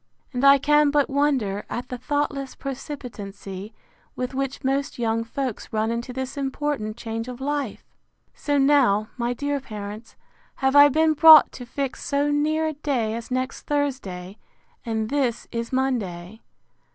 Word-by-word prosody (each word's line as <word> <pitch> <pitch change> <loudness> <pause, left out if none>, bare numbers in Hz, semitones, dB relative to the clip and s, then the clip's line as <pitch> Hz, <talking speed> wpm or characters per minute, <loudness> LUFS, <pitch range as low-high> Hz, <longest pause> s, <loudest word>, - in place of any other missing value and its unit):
And 250 +1 -2
I 280 0 +8
can 295 +1 +4
but 290 -1 +1
wonder 265 -9 +1
at 245 +1 -5
the 250 - -4
thoughtless 280 0 -2
precipitancy 215 -8 -7 0.4
with 250 +1 -3
which 270 +1 -3
most 275 +1 -1
young 230 -1 0
folks 250 0 -4
run 220 +1 0
into 235 +2 -3
this 260 +2 -5
important 270 -5 -2
change 225 0 -5
of 250 -1 -7
life! 280 -3 -3 0.5
So 290 -1 -1
now, 270 -7 +3
my 240 0 -1
dear 285 +3 -2
parents, 215 -2 -8 0.4
have 265 +1 +1
I 290 0 +9
been 315 +2 +3
brought 315 0 +9
to 245 - -9
fix 275 +1 -4
so 285 +1 0
near 310 +2 +1
a 315 - -1
day 270 -7 -1
as 230 0 -6
next 255 0 -3
Thursday; 225 -10 -3 0.4
and 220 -2 -2
this 260 -5 0
is 230 0 -4
Monday. 220 -7 -2
260 Hz, 150 wpm, -24 LUFS, 225-285 Hz, 0.5 s, I